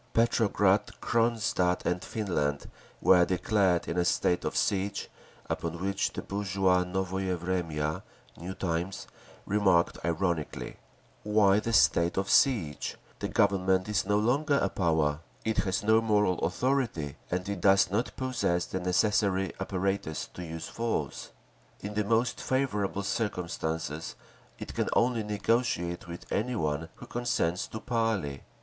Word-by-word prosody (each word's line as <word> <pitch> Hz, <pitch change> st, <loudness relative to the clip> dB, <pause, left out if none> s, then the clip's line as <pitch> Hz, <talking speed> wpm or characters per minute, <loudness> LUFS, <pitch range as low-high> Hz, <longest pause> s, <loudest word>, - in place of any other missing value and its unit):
Petrograd, 105 Hz, -3 st, +2 dB
Cronstadt 115 Hz, -6 st, +1 dB
and 90 Hz, 0 st, 0 dB
Finland 80 Hz, -10 st, -2 dB, 0.3 s
were 90 Hz, -2 st, +6 dB
declared 90 Hz, 0 st, +1 dB
in 85 Hz, -, -1 dB
a -, -, +3 dB
state 90 Hz, 0 st, +1 dB
of -, -, -2 dB
siege—upon 95 Hz, -3 st, -3 dB
which 100 Hz, +2 st, -1 dB
the -, -, -5 dB
bourgeois 95 Hz, -2 st, +1 dB
Novoye 95 Hz, 0 st, -2 dB
Vremya 80 Hz, -4 st, -2 dB, 0.3 s
(New 90 Hz, +3 st, -7 dB
Times) 85 Hz, +1 st, -2 dB, 0.4 s
remarked 95 Hz, -4 st, +2 dB
ironically: 85 Hz, -2 st, -2 dB, 0.4 s
Why 105 Hz, -1 st, +4 dB
the 115 Hz, -, -3 dB
state 85 Hz, -6 st, +4 dB
of 95 Hz, +1 st, 0 dB
siege? 85 Hz, -, +2 dB, 0.2 s
The -, -, -2 dB
Government 95 Hz, -1 st, +2 dB
is 105 Hz, -2 st, +1 dB
no 105 Hz, 0 st, +3 dB
longer 140 Hz, +7 st, +2 dB
a 100 Hz, -, +1 dB
power. 80 Hz, -6 st, +1 dB, 0.3 s
It 110 Hz, 0 st, 0 dB
has 95 Hz, +1 st, 0 dB
no 110 Hz, +1 st, +4 dB
moral 105 Hz, -5 st, +2 dB
authority 110 Hz, -, -1 dB
and 90 Hz, +1 st, -2 dB
it 100 Hz, -3 st, -3 dB
does 95 Hz, -1 st, +5 dB
not 110 Hz, +5 st, -1 dB
possess 120 Hz, -10 st, 0 dB
the 95 Hz, -, -4 dB
necessary 95 Hz, +1 st, +1 dB
apparatus 95 Hz, -4 st, -2 dB
to 90 Hz, -, -7 dB
use 80 Hz, -1 st, -6 dB
force…. 115 Hz, 0 st, -3 dB, 0.5 s
In 105 Hz, +1 st, -5 dB
the 105 Hz, 0 st, 0 dB
most 115 Hz, +3 st, +1 dB
favourable 105 Hz, -7 st, -1 dB
circumstances 85 Hz, -7 st, -3 dB, 0.4 s
it -, -, -7 dB
can -, -, -1 dB
only 120 Hz, -1 st, +2 dB
negotiate 105 Hz, -5 st, -1 dB
with 85 Hz, 0 st, -8 dB
any 125 Hz, +4 st, 0 dB
one 80 Hz, -3 st, -2 dB
who -, -, -11 dB
consents 120 Hz, -8 st, -1 dB
to 110 Hz, -, -6 dB
parley. 110 Hz, -, -1 dB
95 Hz, 135 wpm, -29 LUFS, 85-105 Hz, 0.5 s, were